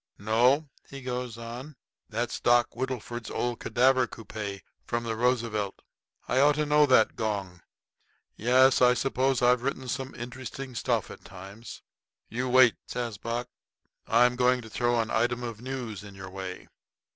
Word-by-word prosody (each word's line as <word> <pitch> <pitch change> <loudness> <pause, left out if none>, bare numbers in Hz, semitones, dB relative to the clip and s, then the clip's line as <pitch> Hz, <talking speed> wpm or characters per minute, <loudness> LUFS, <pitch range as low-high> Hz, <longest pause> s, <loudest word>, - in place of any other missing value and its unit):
"No," 120 +8 +3 0.2
he 135 -1 -9
goes 125 -2 -4
on, 120 +6 -8 0.3
"that's 115 +1 -2
Doc. 120 -1 +4
Whittleford's 120 -2 -4
old 120 -1 -2
cadaver 130 0 +3
coupé 105 -4 -7 0.2
from 120 0 -2
the 115 -1 -2
Roosevelt. 115 -4 -1 0.4
I 130 - +2
ought 145 +1 +5
to 150 0 0
know 150 0 +4
that 130 -4 +4
gong. 100 -5 -3 0.7
Yes, 130 +4 +4
I 125 0 +6
suppose 130 0 +1
I've 125 0 +4
written 130 0 -3
some 135 +1 -4
interesting 130 +2 -7
stuff 120 -2 -1
at - - -12
times." 100 +4 -11 0.5
"You 125 +3 -2
wait," 125 -2 +6
says 115 -4 -4
Buck; 120 +2 -3 0.6
"I'm 120 +2 +4
going 125 0 +3
to 110 - -12
throw 120 0 +1
an 110 -1 -1
item 120 +2 +1
of 115 -2 -6
news 120 -6 -5
in 100 -1 -11
your 95 -1 -9
way." 95 -1 -7
120 Hz, 155 wpm, -28 LUFS, 110-130 Hz, 0.7 s, I